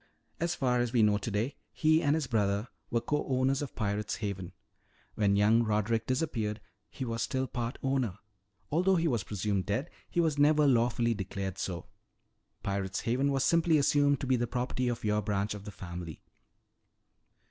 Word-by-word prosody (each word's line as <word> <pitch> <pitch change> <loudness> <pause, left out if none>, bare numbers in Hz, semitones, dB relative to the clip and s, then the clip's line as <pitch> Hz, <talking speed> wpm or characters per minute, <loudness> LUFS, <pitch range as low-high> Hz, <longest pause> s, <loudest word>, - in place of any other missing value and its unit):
As 170 +1 0
far 125 -2 +1
as 120 -1 0
we 115 -3 +4
know 105 -1 +3
today, 110 +6 -2
he 155 +1 +3
and 145 -2 +3
his 160 -3 0
brother 105 -2 0 0.2
were 115 -1 +1
co 150 +4 -1
owners 130 +1 +1
of 145 - -5
Pirate's 105 -1 -1
Haven. 95 -4 -4 0.6
When 100 -2 +2
young 105 +3 +4
Roderick 110 +1 0
disappeared, 115 -6 -1 0.3
he 130 - -5
was 115 -1 -3
still 130 0 0
part 120 -2 -4
owner. 130 -8 0 0.5
Although 185 +5 +3
he 165 -1 +2
was 120 -9 0
presumed 100 -2 -2
dead, 120 +11 -1 0.2
he - - -1
was 160 -4 +2
never 150 +1 +5
lawfully 120 -2 +3
declared 95 -2 -4
so. 85 -3 -3 0.8
Pirate's 100 -1 -2
Haven 130 +4 +1
was 135 -1 +1
simply 165 +2 +4
assumed 145 0 +3
to - - -2
be 130 0 +3
the 120 0 -1
property 125 +1 -1
of 120 -1 -2
your 105 0 +2
branch 100 +1 -1
of 105 -1 -9
the 105 - -6
family." 85 -4 -8
115 Hz, 175 wpm, -30 LUFS, 105-135 Hz, 0.8 s, never